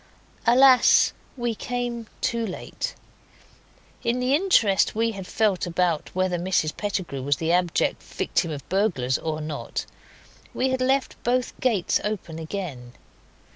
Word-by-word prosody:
Alas! 255 Hz, +1 st, +6 dB, 0.2 s
we 240 Hz, -1 st, -1 dB
came 240 Hz, 0 st, -4 dB
too 235 Hz, -1 st, 0 dB
late. 200 Hz, -5 st, -5 dB, 1.1 s
In 235 Hz, +2 st, 0 dB
the 250 Hz, +2 st, +1 dB
interest 285 Hz, -, +3 dB
we 230 Hz, +1 st, +1 dB
had 195 Hz, -3 st, -7 dB
felt 210 Hz, -5 st, +1 dB
about 170 Hz, -2 st, 0 dB
whether 185 Hz, -1 st, 0 dB
Mrs 175 Hz, -3 st, 0 dB
Pettigrew 185 Hz, -9 st, -3 dB
was 140 Hz, +2 st, +1 dB
the 160 Hz, 0 st, -1 dB
abject 175 Hz, -1 st, +1 dB
victim 170 Hz, -, -1 dB
of 145 Hz, -3 st, -6 dB
burglars 175 Hz, -, +1 dB
or 155 Hz, -1 st, -3 dB
not, 150 Hz, -1 st, -4 dB, 0.7 s
we 265 Hz, -, +1 dB
had 260 Hz, 0 st, -1 dB
left 265 Hz, +1 st, 0 dB
both 250 Hz, +1 st, 0 dB
gates 220 Hz, -9 st, +1 dB
open 185 Hz, -6 st, -4 dB
again. 155 Hz, -8 st, -6 dB
195 Hz, 135 wpm, -25 LUFS, 165-240 Hz, 1.1 s, Alas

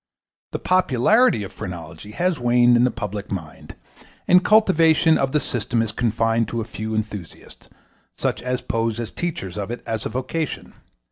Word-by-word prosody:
The -, -, -2 dB
popularity 185 Hz, -, +3 dB
of 95 Hz, -, -8 dB
phrenology 90 Hz, +3 st, -8 dB
has 175 Hz, +2 st, 0 dB
waned 120 Hz, 0 st, +4 dB
in 120 Hz, +1 st, +4 dB
the -, -, +3 dB
public 105 Hz, -2 st, -6 dB
mind, 80 Hz, -6 st, -7 dB, 0.5 s
and 180 Hz, 0 st, +6 dB
cultivation 165 Hz, -7 st, +4 dB
of 135 Hz, -2 st, 0 dB
the 150 Hz, -, +2 dB
system 120 Hz, -3 st, -2 dB
is 110 Hz, -, -3 dB
confined 115 Hz, 0 st, 0 dB
to 115 Hz, -, -3 dB
a -, -, -1 dB
few 110 Hz, 0 st, -5 dB
enthusiasts, 105 Hz, -5 st, -7 dB, 0.5 s
such -, -, -2 dB
as 125 Hz, 0 st, -2 dB
pose 115 Hz, 0 st, -1 dB
as 115 Hz, -, -4 dB
teachers 105 Hz, -, -4 dB
of 100 Hz, -, -4 dB
it 120 Hz, -, -6 dB
as 110 Hz, -1 st, -3 dB
a -, -, -3 dB
vocation. 130 Hz, +6 st, -4 dB
120 Hz, 165 wpm, -22 LUFS, 110-150 Hz, 0.5 s, and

